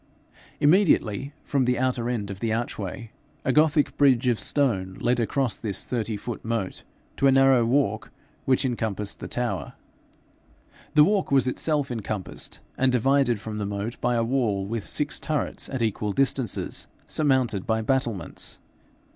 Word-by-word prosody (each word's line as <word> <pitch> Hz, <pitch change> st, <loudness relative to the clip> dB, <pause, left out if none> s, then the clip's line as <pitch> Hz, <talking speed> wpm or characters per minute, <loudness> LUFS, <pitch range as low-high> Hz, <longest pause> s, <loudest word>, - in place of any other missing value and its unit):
Immediately 145 Hz, -, +3 dB
from 135 Hz, -3 st, +1 dB
the 125 Hz, 0 st, +1 dB
outer 125 Hz, -2 st, 0 dB
end 105 Hz, -5 st, -2 dB
of 95 Hz, -, -7 dB
the 115 Hz, 0 st, -1 dB
archway, 115 Hz, 0 st, -4 dB, 0.3 s
a -, -, +3 dB
Gothic 150 Hz, 0 st, +3 dB
bridge 130 Hz, -3 st, +4 dB
of 120 Hz, -, +1 dB
stone 95 Hz, -10 st, 0 dB
led 125 Hz, 0 st, +1 dB
across 120 Hz, +1 st, 0 dB
this 100 Hz, -5 st, -3 dB
thirty 115 Hz, -3 st, -2 dB
foot 115 Hz, +2 st, -6 dB
moat 115 Hz, -4 st, -2 dB, 0.4 s
to 140 Hz, -, +3 dB
a -, -, +6 dB
narrow 135 Hz, -2 st, +5 dB
walk 115 Hz, -4 st, +1 dB, 0.4 s
which 135 Hz, +1 st, +3 dB
encompassed 110 Hz, -4 st, -2 dB
the -, -, -6 dB
tower. -, -, -3 dB, 1.2 s
The 150 Hz, -, +8 dB
walk 200 Hz, +3 st, +2 dB
was 135 Hz, -2 st, +4 dB
itself 145 Hz, +1 st, 0 dB
encompassed 110 Hz, -4 st, -4 dB, 0.2 s
and 130 Hz, 0 st, +4 dB
divided 125 Hz, -1 st, +2 dB
from 110 Hz, 0 st, -6 dB
the 100 Hz, -, -2 dB
moat 100 Hz, +3 st, -4 dB
by 120 Hz, 0 st, +1 dB
a 115 Hz, -, +2 dB
wall 115 Hz, -6 st, 0 dB
with 110 Hz, 0 st, -4 dB
six 150 Hz, 0 st, -1 dB
turrets 155 Hz, -2 st, -1 dB
at 130 Hz, -3 st, -2 dB
equal 105 Hz, -1 st, -1 dB
distances, 130 Hz, -2 st, 0 dB, 0.2 s
surmounted 130 Hz, -9 st, +1 dB
by 110 Hz, 0 st, +1 dB
battlements. 115 Hz, -, -2 dB
120 Hz, 155 wpm, -25 LUFS, 110-135 Hz, 1.2 s, The